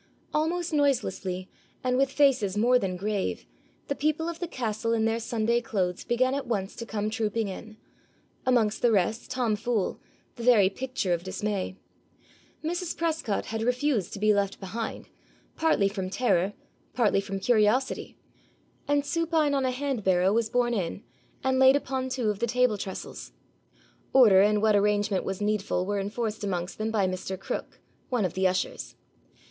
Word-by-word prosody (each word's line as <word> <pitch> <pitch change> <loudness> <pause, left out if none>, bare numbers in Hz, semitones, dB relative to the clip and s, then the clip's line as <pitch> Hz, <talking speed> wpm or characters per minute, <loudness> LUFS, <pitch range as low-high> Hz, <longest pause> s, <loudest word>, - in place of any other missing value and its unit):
Almost 330 +2 0
noiselessly, 195 -10 0 0.4
and 250 0 +1
with 270 +1 +2
faces 245 -10 +3
more 245 +4 +4
than 190 -5 -2
grave, 200 0 -2 0.4
the - - 0
people 310 +3 0
of 340 -1 -5
the 350 - -3
castle 230 -5 -2
in 225 -1 +2
their 225 +1 +1
Sunday 235 0 0
clothes 185 -6 -2
began 255 +2 +1
at 280 -2 -3
once 200 -4 -2
to 230 - -6
come 215 -1 -2
trooping 220 0 -1
in, 215 +3 -8 0.7
amongst 230 -4 +2
the 240 - +4
rest 215 +3 0
Tom 245 -4 0
Fool, 225 -2 -1 0.4
the 235 - -6
very 215 -6 +5
picture 250 -5 -2
of 170 - -1
dismay. 195 0 -3 0.9
Mrs. 345 +2 -2
Prescot 320 -11 -1
had 225 0 -4
refused 250 -2 0
to 200 - -6
be 215 +1 +4
left 200 -1 0
behind, 220 +4 -5 0.5
partly 315 -11 +3
from 195 -2 -3
terror, 195 -3 +1 0.4
partly 215 -5 +3
from 195 0 -4
curiosity, 240 +4 +1 0.7
and 290 0 +2
supine 325 -2 +1
on 270 -1 +1
a - - +2
hand 265 -3 -2
barrow 185 +1 +3
was 225 0 +1
borne 245 -1 +1
in, 195 -1 -3 0.4
and 260 0 +2
laid 265 +1 +7
upon 265 -2 -2
two 250 -5 0
of 205 - -6
the 235 - 0
table 250 -1 +2
trestles. 190 -1 -7 0.8
Order 215 -8 +7
and 210 +1 +3
what 215 -1 +4
arrangement 205 -1 +2
was 195 +1 -4
needful 205 -3 0
were 205 +1 -1
enforced 215 +2 -3
amongst 180 -2 -3
them 215 +1 -1
by 215 -3 +1
Mr. 185 0 -4
Cook, - - -5 0.3
one 245 -6 +1
of 180 - -2
the 190 0 +2
ushers. 185 0 -2
220 Hz, 165 wpm, -27 LUFS, 200-255 Hz, 0.9 s, laid